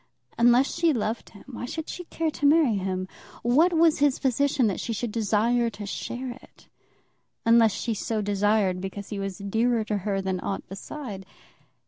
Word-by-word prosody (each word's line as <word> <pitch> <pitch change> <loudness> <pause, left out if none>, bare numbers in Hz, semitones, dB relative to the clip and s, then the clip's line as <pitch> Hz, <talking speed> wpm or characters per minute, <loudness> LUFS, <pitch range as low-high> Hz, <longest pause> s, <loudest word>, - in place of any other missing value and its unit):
Unless 240 +3 +4
she 335 -2 +2
loved 225 -1 -2
him, 200 - -15
why 245 -2 -6
should 320 +5 -5
she 360 - -6
care 325 -1 -2
to 290 - +1
marry 295 -6 +4
him? 185 -1 -2 0.4
What 290 +10 +4
was 330 -2 +4
his 285 -2 +3
position 275 0 +1
that 200 -4 0
she 230 - -3
should 225 +1 -3
desire 230 +2 +1
to 210 -2 -8
share 245 +5 -5
it; 245 - -16 0.8
unless 230 -2 +5
she 230 - -2
so 220 +1 -2
desired 205 -2 +1
because 195 +1 -6
he 205 - -4
was 195 -1 -4
dearer 225 +3 +1
to 210 -1 -2
her 195 0 -2
than 190 -1 -2
aught 195 - -4
beside? 195 -1 -7
230 Hz, 175 wpm, -26 LUFS, 200-265 Hz, 0.8 s, unless